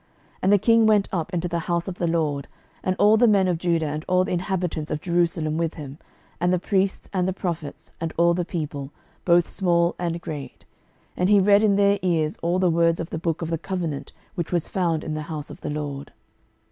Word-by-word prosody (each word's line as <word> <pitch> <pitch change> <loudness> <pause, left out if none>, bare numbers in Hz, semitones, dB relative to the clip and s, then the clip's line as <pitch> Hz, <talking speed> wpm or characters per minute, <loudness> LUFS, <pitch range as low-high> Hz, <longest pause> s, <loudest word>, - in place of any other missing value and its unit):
12:023:002 - - -38 0.3
And 190 +2 +4
the - - +7
king 230 +2 +4
went 210 -2 +3
up 170 -2 -2
into 175 -1 -1
the 170 -1 -2
house 170 +1 -2
of 185 -1 -6
the 175 - 0
LORD, 155 -4 -1 0.4
and 185 - 0
all 210 +1 +5
the 240 +2 +5
men 200 -3 +4
of 175 -3 0
Judah 170 -2 +1
and 150 +1 -3
all 185 0 +3
the - - -4
inhabitants 180 -4 -2
of 150 - -2
Jerusalem 165 -2 0
with 165 -1 -1
him, 145 -1 -9 0.4
and 175 +1 +2
the 180 - +3
priests, 195 +1 0
and 185 -1 +1
the 190 - 0
prophets, 170 -6 -5
and 165 -1 -2
all 170 +1 +4
the 175 +1 -1
people, 150 -5 -4 0.4
both 175 -1 +4
small 170 -2 +2
and 170 -1 -2
great: 150 -5 -8 0.5
and 180 +1 +1
he 205 -1 +6
read 200 +1 +5
in 210 -2 +3
their 200 0 +3
ears 160 -4 +1
all 170 +2 +1
the 185 -2 +3
words 165 0 +2
of 165 - -5
the 160 - -3
book 165 0 -2
of 165 - -4
the 165 - -1
covenant 160 -8 -4 0.2
which 170 -2 -4
was 175 -3 0
found 170 -4 0
in 155 - -4
the 155 - -3
house 150 -2 -5
of - - -12
the - - -4
LORD. 145 -2 -5
170 Hz, 230 wpm, -24 LUFS, 160-185 Hz, 0.5 s, the